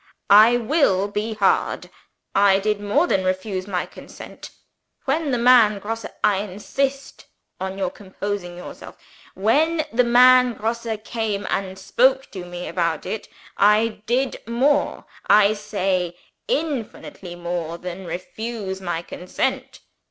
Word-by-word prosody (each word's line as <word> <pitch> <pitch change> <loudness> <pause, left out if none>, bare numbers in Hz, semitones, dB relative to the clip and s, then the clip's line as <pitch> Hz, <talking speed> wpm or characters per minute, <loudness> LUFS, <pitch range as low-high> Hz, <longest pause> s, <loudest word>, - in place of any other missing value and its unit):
I 220 +4 +8
will 230 - +2
be 215 +2 -3
heard! 200 -2 +1 0.4
I 195 -1 +5
did 210 +1 -1
more 240 +11 +2
than 195 - +1
refuse 185 +1 -2
my 180 -3 -2
consent. - - -11 0.6
When 300 +2 0
the 250 - +1
man 235 -3 +5
Grosse 225 +2 -5 0.2
I 205 -2 +4
insist 265 +8 -3 0.3
on 190 +1 -4
your 190 -2 -1
composing 195 -2 -6
yourself 180 - -10 0.4
when 310 - +2
the 250 +2 +4
man 250 +1 +6
Grosse 230 +2 -3 0.2
came 220 -4 -3
and 190 -1 -2
spoke 260 +7 +2
to 185 -3 -7
me 175 0 -7
about 170 -3 -1
it, 220 - -5 0.3
I 210 +2 +3
did 255 +3 0
more, 280 +5 +1 0.2
I 210 0 +6
say, 190 -4 -2 0.3
infinitely 270 - -4
more, 170 -1 -4
than 180 +1 -7
refuse 190 +3 -5
my 175 -2 -3
consent. 180 +1 -4
205 Hz, 130 wpm, -22 LUFS, 190-240 Hz, 0.6 s, I